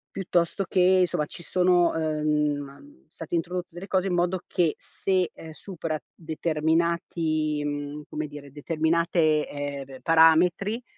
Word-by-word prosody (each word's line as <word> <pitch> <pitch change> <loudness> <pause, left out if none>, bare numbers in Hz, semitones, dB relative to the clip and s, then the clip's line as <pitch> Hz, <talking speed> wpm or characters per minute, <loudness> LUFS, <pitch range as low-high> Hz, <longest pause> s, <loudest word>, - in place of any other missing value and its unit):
Piuttosto 185 0 0
che, 185 - 0 0.2
insomma, 155 -3 0
ci 170 - -9
sono, 180 -1 +3
ehm, 150 - -2
state 165 +1 -10
introdotte 180 +1 -2
delle 175 +4 -9
cose 190 0 +1
in 185 - -1
modo 175 +1 +1
che 170 -3 +1
se, 185 -2 -1
ehm, 160 - -10
supera 160 -1 -5 0.2
determinati, 160 -1 -1
mhmm, 145 0 -4
come 155 0 -4
dire, 145 -1 -11
determinate, 160 +1 +1
ehm, 145 -1 -5
r 130 -1 -12
parametri, 170 +8 +4
160 Hz, 130 wpm, -26 LUFS, 150-175 Hz, 0.2 s, parametri